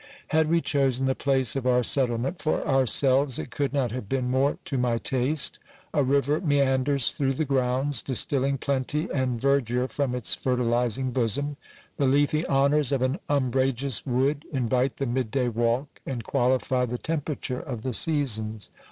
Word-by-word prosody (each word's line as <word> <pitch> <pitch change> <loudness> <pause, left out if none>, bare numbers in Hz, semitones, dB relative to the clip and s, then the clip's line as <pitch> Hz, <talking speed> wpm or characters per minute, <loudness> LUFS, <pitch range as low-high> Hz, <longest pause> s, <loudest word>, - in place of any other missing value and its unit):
Had 160 0 +2
we 170 0 +2
c'losen 135 -2 +1
the 130 - +2
place 135 -2 0
of 130 -2 -2
our 125 0 +3
settlement 125 +5 +1
for 155 - -1
ourselves, 135 0 +4
it 125 - -6
could 140 +1 -1
not 135 -5 0
have 115 -5 -6
been 130 -2 -1
more 135 +2 +1
to 135 - -2
my 120 -2 +1
taste: 130 +4 0 0.3
a 145 - +2
river 140 +3 +1
meanders 140 -4 +1
through 135 -1 -1
the 155 +4 -1
grounds, 130 -1 +1
distilling 135 +1 0
plenty 140 +5 -1
and 130 -3 -1
ver 140 +2 +3
dure 125 +2 -2
from 135 -2 -2
its 125 -3 0
fertilizing 125 0 0
bosom; 130 +4 -1 0.4
the 140 - +2
leafy 145 +3 +2
honours 140 0 +2
of 135 -2 +1
an 130 +7 0
umbrageous 135 -2 0
wood 135 +3 0
invite 130 -1 0
the 135 - -2
mid 125 -1 -1
day 125 0 0
walk, 120 +4 -1
and 125 -4 -5
qualify 130 0 +1
the 125 0 -2
temperature 145 -4 -3
of 120 -4 -6
the 130 - -2
seasons. 110 -6 -1
130 Hz, 170 wpm, -26 LUFS, 125-140 Hz, 0.4 s, ourselves